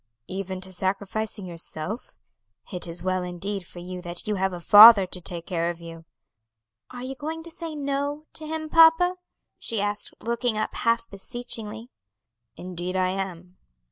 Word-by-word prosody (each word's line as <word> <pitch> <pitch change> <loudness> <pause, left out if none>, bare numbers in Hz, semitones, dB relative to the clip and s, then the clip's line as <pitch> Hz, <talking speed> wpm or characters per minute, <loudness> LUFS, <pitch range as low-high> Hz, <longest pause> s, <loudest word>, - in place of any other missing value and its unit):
"Even 190 +2 -5
to 185 0 -9
sacrificing 200 +3 -2
yourself? 170 +4 -5 0.6
It 180 -1 -3
is 170 0 -6
well 185 0 0
indeed 180 +1 -4
for - - -15
you 180 +1 -6
that 175 -1 -5
you 210 - 0
have 190 -1 0
a 175 - -6
father 205 +2 +10
to 180 0 -5
take 170 -1 -4
care 170 -1 -1
of 175 -1 -5
you." 165 -1 -10 0.8
"Are 245 0 -8
you 260 +1 -4
going 315 +4 -5
to 335 - -8
say 325 -1 -5
'No' 285 +1 -2
to 310 - -7
him, 315 0 -3
papa?" 330 +3 +6 0.4
she 225 - -3
asked, 205 +1 -2
looking 235 -1 -1
up 215 - -2
half 230 -1 +1
beseechingly. 225 +2 -5 0.6
"Indeed 180 0 -5
I 185 0 +2
am." 185 -1 -5
200 Hz, 165 wpm, -25 LUFS, 180-245 Hz, 0.8 s, father